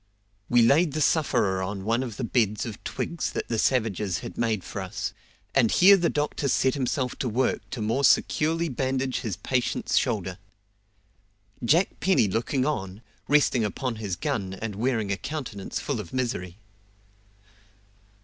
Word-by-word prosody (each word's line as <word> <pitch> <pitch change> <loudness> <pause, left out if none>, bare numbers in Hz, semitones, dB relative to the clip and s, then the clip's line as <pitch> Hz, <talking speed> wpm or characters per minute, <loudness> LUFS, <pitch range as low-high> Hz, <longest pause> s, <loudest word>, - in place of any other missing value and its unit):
We 120 -1 +5
laid 145 +6 +4
the 155 - -2
sufferer 130 - +2
on 95 +1 -4
one 115 +4 +1
of 120 -5 -5
the - - -3
beds 110 -3 +1
of 110 -3 -8
twigs 170 -1 -3
that - - -4
the 115 -2 0
savages 105 -8 0
had - - -7
made 110 -5 0
for 100 - -5
us, 95 -1 -4 0.4
and 125 -5 +4
here 195 - +7
the 175 -3 +1
doctor 145 -1 -1
set 130 0 +2
himself 130 -1 -1
to 125 - -2
work 125 +4 -1
to 120 -5 -4
more 115 +6 0
securely 165 +4 +3
bandage 130 -1 -1
his 105 -7 -4
patient's 125 -2 0
shoulder; 95 -7 -2 1.2
Jack 165 +11 +2
Penny 185 - +3
looking 120 +6 0
on, 100 -7 -3 0.2
resting 145 -5 +3
upon 115 +3 -2
his 100 -5 -3
gun, 95 +1 -2
and 110 +2 -5
wearing 110 -2 0
a 100 - 0
countenance 135 -8 -5
full 140 -6 -3
of 95 -6 -8
misery. 110 -8 -2
120 Hz, 160 wpm, -26 LUFS, 105-135 Hz, 1.2 s, here